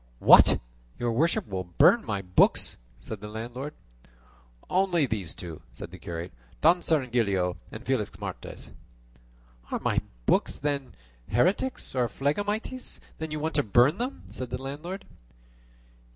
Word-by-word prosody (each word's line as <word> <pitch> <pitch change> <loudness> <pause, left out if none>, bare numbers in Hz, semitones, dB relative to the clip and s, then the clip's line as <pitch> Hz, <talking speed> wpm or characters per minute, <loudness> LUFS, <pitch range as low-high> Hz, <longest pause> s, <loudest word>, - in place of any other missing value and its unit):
"What! - - +7 0.4
your 120 -1 0
worship 155 +9 +2
would 95 -5 -6
burn - - +6
my 100 -1 -3
books!" 90 -1 +3 0.2
said 110 -3 -8
the 105 - -6
landlord. 120 +7 -6 0.9
"Only 180 -4 +2
these 105 -9 -3
two," 85 -5 -7
said 85 - -9
the 90 - -10
curate, 85 +1 -6 0.3
"Don 170 +3 +5
Cirongilio, 115 - +1
and 110 +4 -9
Felixmarte." 125 -6 -4 1.0
"Are - - -1
my - - +1 0.2
books, - - +2
then, 140 -2 -2 0.3
heretics 185 - +2
or 125 -2 +2
phlegmatics 205 - -1 0.2
that 160 -1 -4
you 155 - -2
want 160 +2 -2
to 145 - +3
burn 125 - +4
them?" 255 +3 -3
said 130 -2 -6
the 125 +1 -4
landlord. 155 +9 -6
130 Hz, 135 wpm, -27 LUFS, 105-160 Hz, 1.0 s, What